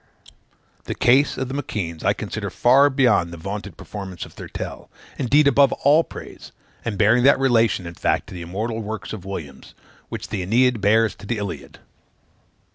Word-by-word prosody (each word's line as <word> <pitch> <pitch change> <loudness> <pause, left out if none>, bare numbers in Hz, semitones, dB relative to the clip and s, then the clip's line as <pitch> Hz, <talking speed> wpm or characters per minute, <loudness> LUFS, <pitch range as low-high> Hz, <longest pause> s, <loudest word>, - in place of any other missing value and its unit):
The - - -4
case 135 +4 +3
of 130 - -2
the 130 - -6
M'Keands 95 - -4
I - - +3
consider - - -5
far 135 +4 +4
beyond 125 -10 +2
the 85 - -8
vaunted 100 +1 -6
performance 95 -4 -7
of - - -15
Thurtell, - - -7 0.3
indeed 145 +3 +4
above 140 -1 +5
all 150 +4 +4
praise; - - -11 0.3
and 110 -4 -3
bearing 110 +5 +4
that 140 - +6
relation, 115 -8 +2
in 85 - -7
fact, - - 0
to - - -10
the 90 - -7
immortal 110 +7 -4
works 105 -2 -6
of 95 -4 -8
Williams, 75 -8 -8 0.3
which - - -6
the 100 -4 -3
Æneid 120 +3 +2
bears 110 +2 +3
to 100 - -13
the 115 - -1
Iliad. 100 -3 -6
110 Hz, 175 wpm, -22 LUFS, 95-130 Hz, 0.3 s, that